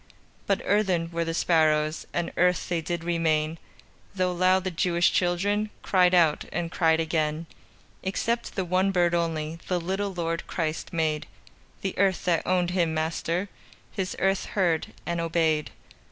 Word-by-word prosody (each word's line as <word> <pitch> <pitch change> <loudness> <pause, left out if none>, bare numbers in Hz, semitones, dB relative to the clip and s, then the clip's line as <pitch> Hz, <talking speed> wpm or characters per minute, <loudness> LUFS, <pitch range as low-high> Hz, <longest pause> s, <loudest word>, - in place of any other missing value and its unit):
But 200 - +1
earthen 185 -5 +1
were 170 0 -1
the 165 0 -3
sparrows, 155 -2 +2
And 175 -1 -2
earth 180 0 +2
they 170 -2 0
did 170 +1 -3
remain, 160 -2 0 0.6
Though 185 -1 +1
loud 185 +1 +3
the 185 - -2
Jewish 170 0 +2
children 200 +4 +1
Cried 180 -1 +4
out, 165 -4 +3
and 170 -1 -3
cried 160 -2 +3
again. 160 0 -1 0.6
Except 230 +5 -2
the 190 - -1
one 185 +2 +2
bird 175 -2 +2
only 165 -1 -1
The 180 -1 0
little 195 +4 -2
Lord 165 -2 -3
Christ 160 -2 -3
made; 160 -3 -1 0.5
The 195 - -3
earth 195 -2 +2
that 170 -3 +1
owned 180 -1 +2
Him 170 -3 +1
Master, 165 +4 -1 0.4
His 190 -3 -3
earth 195 0 +1
heard 175 -5 0 0.2
and 170 0 -1
obeyed. 160 -2 +1
170 Hz, 155 wpm, -26 LUFS, 165-185 Hz, 0.6 s, Cried